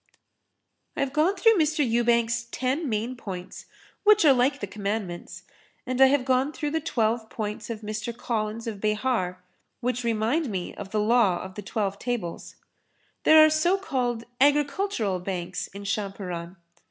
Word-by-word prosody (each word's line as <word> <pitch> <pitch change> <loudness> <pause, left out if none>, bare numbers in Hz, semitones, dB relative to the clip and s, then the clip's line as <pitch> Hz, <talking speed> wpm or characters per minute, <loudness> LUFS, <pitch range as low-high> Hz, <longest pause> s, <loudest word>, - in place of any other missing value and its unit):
I - - 0
have 275 -1 -1
gone 320 +6 +2
through 430 +1 +4
Mr. 305 -3 +2
Ewbank's 235 0 +2
ten 260 +5 -2
main 225 +3 -2
points 185 -5 -8 0.4
which 425 -3 +6
are 285 - +8
like 260 +3 +2
the - - -3
Commandments, 200 -3 -5 0.4
and 255 +1 -1
I 265 - +9
have 265 -1 +2
gone 260 +2 +2
through 295 -1 -3
the 320 +1 0
twelve 225 -6 0
points 210 0 -5
of 225 -2 -5
Mr. 215 +2 -4
Collins 225 -1 -3
of 215 -4 -5
Behar, 210 -4 -1 0.4
which 250 0 -2
remind 235 +6 0
me 185 -4 -4
of 195 - -8
the 215 - -1
law 210 -4 +3
of 190 0 -8
the 210 - -7
Twelve 200 -1 -2
Tables. 240 -9 -4 0.7
There 315 0 +9
are - - +5
so 345 +5 +3
called 245 - -2 0.2
agricultural 285 - +2
banks 180 -1 -4
in 200 +1 -10
Champaran. 195 -4 -4
235 Hz, 160 wpm, -26 LUFS, 205-275 Hz, 0.7 s, I